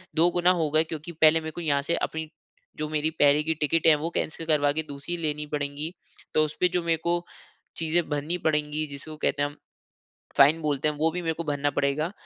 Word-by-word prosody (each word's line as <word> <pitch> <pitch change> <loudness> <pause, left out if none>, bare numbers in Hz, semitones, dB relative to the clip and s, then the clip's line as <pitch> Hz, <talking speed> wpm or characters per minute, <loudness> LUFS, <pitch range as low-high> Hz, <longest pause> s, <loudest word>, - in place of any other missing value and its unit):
2 165 +2 +5
गुना 175 +1 +3
हो 155 - +1
गए 155 +1 +4
क्योंकि 160 +1 -7
पहले 160 0 +5
मेरे 160 0 -5
को 175 - -7
यहाँ 145 -4 +1
से 170 +4 0
अपनी, 160 0 -3 0.5
जो 155 0 -3
मेरी 155 0 0
पहले 145 +1 +5
की 160 - 0
टिकट 165 +2 +2
है 155 - +8
वो - - 0
कैंसल 160 +1 -3
करवा 150 -2 +3
के 160 +2 -1
दूसरी 145 +5 -5
लेनी 150 -2 -2
पड़ेंगी, 145 +3 -3 0.4
तो 155 - +4
उसपे 155 +4 0
जो 175 - -1
मेरे 165 -1 +1
को, 175 0 0 0.5
चीज़ें 165 +1 0
भरनी 150 +4 -1
पड़ेगी 150 0 0
जिसको 145 +2 -7
कहते 145 -1 0
हैं 145 - 0
हम, 145 - -16 0.8
फ़ाइन 145 +4 +6
बोलते 150 -1 0
हैं, 150 - -4
वो 160 +2 +2
भी 180 +2 -3
मेरे 165 -1 -1
को 165 +1 -5
भरना 145 -1 0
पड़ेगा 145 +4 0
155 Hz, 220 wpm, -26 LUFS, 145-165 Hz, 0.8 s, है